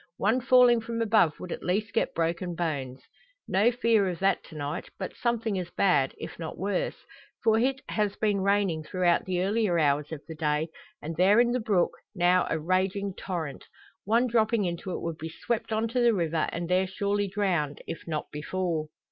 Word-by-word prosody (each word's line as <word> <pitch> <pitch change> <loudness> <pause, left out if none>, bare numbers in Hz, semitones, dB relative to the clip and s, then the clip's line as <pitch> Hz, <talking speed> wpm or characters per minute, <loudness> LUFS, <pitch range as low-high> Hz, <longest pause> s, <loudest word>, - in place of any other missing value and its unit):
One 225 +6 +2
falling 250 -2 +5
from 230 +1 -4
above 215 -8 +3
would 180 - -7
at - - -4
least 200 +4 -1
get - - 0
broken 170 +1 -1
bones. 135 -6 -3 0.4
No 205 +6 +3
fear 230 -5 +2
of 175 - -4
that 195 +3 +1
to 160 - -13
night, 145 -1 -4
but - - -5
something 230 -4 -1
as 175 -2 -5
bad, 145 -9 +2
if - - -8
not 160 -2 -6
worse. 195 0 -2 0.4
For 220 0 +4
it 265 +2 +1
has 210 -2 -1
been 205 -3 +1
raining 195 -4 +1
throughout 175 +2 +1
the 180 -1 0
earlier 200 -2 +1
hours 145 -1 +1
of 155 -2 -6
the 165 - -6
day, 155 0 0 0.3
and 160 +2 -4
there 195 +5 +5
in 240 0 +4
the 250 - +1
brook, 205 -6 +2 0.2
now 180 0 +3
a - - 0
raging 185 +4 0
torrent. 170 -7 -5 0.4
One 230 +4 +3
dropping 225 -3 +2
into 170 +1 -4
it - - -4
would 165 -1 -4
be 160 - -5
swept 225 +7 -3
on 220 +1 +1
to 250 +2 -1
the 235 -2 +4
river, 165 -3 0
and 170 0 -4
there 185 +2 +2
surely 200 +1 -1
drowned, 185 -7 -1
if 165 - -7
not 155 -2 -3
before. 160 +1 -2
185 Hz, 195 wpm, -28 LUFS, 165-220 Hz, 0.4 s, falling